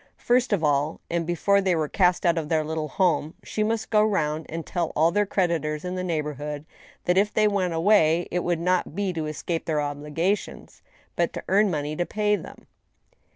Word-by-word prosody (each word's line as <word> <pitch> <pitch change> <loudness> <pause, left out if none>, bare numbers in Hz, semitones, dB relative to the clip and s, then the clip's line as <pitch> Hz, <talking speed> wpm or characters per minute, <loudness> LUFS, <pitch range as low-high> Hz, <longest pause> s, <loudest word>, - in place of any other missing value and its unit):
First 245 +1 +2
of 195 -6 +1
all, 145 +1 +1
and 170 -1 -1
before 200 +4 +2
they 190 -2 +2
were 155 -2 0
cast 180 +2 +2
out 170 -1 +4
of 160 -3 -3
their 160 -1 +2
little 155 0 -3
home, 160 -1 0
she 215 - -3
must 220 +1 -1
go 210 -1 +5
round 160 -7 0
and 165 0 -5
tell 175 -3 -2
all 160 +2 +4
their 205 +1 +1
creditors 170 -5 -1
in 180 - -3
the 185 0 -3
neighborhood 150 -3 -3 0.4
that 180 +1 +3
if 205 +1 +1
they 215 0 +3
went 185 -5 0
away 170 -2 +3
it 180 0 -1
would 175 -2 0
not 180 -2 0
be 200 -2 -1
to 160 -2 -3
escape 160 +2 -3
their 155 -2 0
obligations, 150 +7 -3 0.3
but - - 0
to - - -6
earn 205 +2 +4
money 150 -2 -2
to 175 +2 -2
pay 210 0 +1
them. - - -10
170 Hz, 200 wpm, -25 LUFS, 155-195 Hz, 0.4 s, go